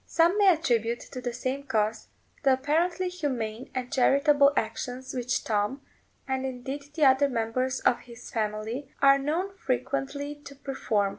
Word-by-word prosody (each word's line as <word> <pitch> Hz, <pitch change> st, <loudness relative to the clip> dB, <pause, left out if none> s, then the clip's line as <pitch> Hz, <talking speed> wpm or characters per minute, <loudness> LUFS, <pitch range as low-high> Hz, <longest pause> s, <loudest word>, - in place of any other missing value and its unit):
Some 340 Hz, +5 st, +3 dB
may 405 Hz, -, +5 dB
attribute 240 Hz, -, +2 dB
to 255 Hz, -, -6 dB
the 245 Hz, 0 st, -2 dB
same 255 Hz, +3 st, -3 dB
cause 220 Hz, -3 st, 0 dB, 0.4 s
the 270 Hz, -2 st, +5 dB
apparently 335 Hz, +7 st, +1 dB
humane 255 Hz, -10 st, -3 dB
and 250 Hz, -1 st, -3 dB
charitable 280 Hz, +2 st, +5 dB
actions 250 Hz, +3 st, -3 dB
which 250 Hz, -1 st, -1 dB
Tom, 215 Hz, +5 st, -1 dB, 0.5 s
and 265 Hz, -1 st, -1 dB
indeed 265 Hz, +2 st, -5 dB
the 305 Hz, -, +4 dB
other 270 Hz, +1 st, +5 dB
members 255 Hz, +2 st, -1 dB
of 240 Hz, -, +3 dB
his 240 Hz, 0 st, -12 dB
family, 220 Hz, +4 st, -3 dB
are 275 Hz, 0 st, +6 dB
known 340 Hz, +8 st, -2 dB
frequently 275 Hz, +1 st, -2 dB
to 280 Hz, -, -10 dB
perform. 230 Hz, -7 st, -1 dB
265 Hz, 150 wpm, -27 LUFS, 240-285 Hz, 0.5 s, are